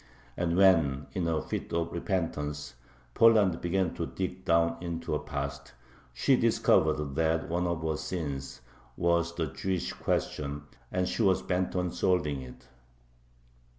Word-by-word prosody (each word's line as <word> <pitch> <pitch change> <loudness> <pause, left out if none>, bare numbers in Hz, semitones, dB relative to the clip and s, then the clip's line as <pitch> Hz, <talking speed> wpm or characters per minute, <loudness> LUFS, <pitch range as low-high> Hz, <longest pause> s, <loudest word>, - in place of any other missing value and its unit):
And 85 0 0
when, 80 -8 +4
in 90 -3 -1
a 80 -2 0
fit - - -4
of 85 0 0
repentance, 75 -5 -2 0.4
Poland 105 - +5
began 90 0 0
to - - -3
dig 95 0 -4
down 85 0 +3
into 85 -1 -4
her 75 - +1
past, 70 -1 -5 0.4
she - - +3
discovered 75 -2 +2
that 80 +1 +1
one 90 +2 0
of 85 -2 -2
her 80 -1 -1
"sins" 70 -7 -4 0.4
was 85 0 +1
the 85 - 0
Jewish 90 +5 -3
question, 70 0 -2 0.3
and 90 0 0
she - - -2
was 95 -3 +3
bent 90 0 -1
on 90 -1 0
solving 75 -8 +1
it. 60 -1 -12
85 Hz, 145 wpm, -29 LUFS, 75-90 Hz, 0.4 s, Poland